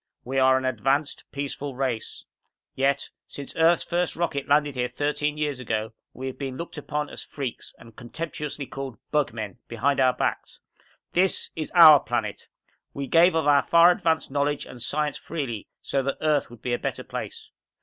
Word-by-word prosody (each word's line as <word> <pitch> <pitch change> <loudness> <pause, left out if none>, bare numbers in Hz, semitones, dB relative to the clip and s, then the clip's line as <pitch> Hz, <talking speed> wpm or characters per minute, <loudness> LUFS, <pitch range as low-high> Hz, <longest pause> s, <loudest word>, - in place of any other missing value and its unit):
We 135 +2 -1
are 130 0 +5
an 130 - -2
advanced, 135 +3 0
peaceful 140 -1 -4
race. 125 -4 -3 0.5
Yet, 140 +1 0 0.2
since 140 -1 -8
Earth's 165 +1 +4
first 175 0 -1
rocket 160 -5 -2
landed 145 0 +3
here 125 -1 -1
thirteen 150 +2 -1
years 145 -3 -1
ago, 110 -2 -2 0.2
we 130 - -8
have 130 - -5
been 135 -2 -4
looked 170 - -6
upon 150 0 -3
as - - -6
freaks 135 -5 -6
and 115 -1 -15
contemptuously 150 +2 -5
called 135 -4 -7
'bug 150 -2 +2
men' 110 0 -6
behind 135 +5 0
our 130 -1 +4
backs! 125 - -3 0.5
This 185 +1 +2
is 155 -2 -3
our 155 -4 +10
planet. 115 -4 -3 0.5
We 140 - -3
gave 165 +5 +5
of 160 -2 +1
our 145 -1 +5
far 170 +1 +6
advanced 165 -4 0
knowledge 145 +1 0
and 125 - -11
science 150 +2 -1
freely, 135 -10 -4 0.2
so 135 - 0
that 135 +1 -2
Earth 150 -2 +1
would 120 -1 -14
be 125 - -1
a 120 - 0
better - - -3
place. - - -7
140 Hz, 180 wpm, -25 LUFS, 130-150 Hz, 0.5 s, our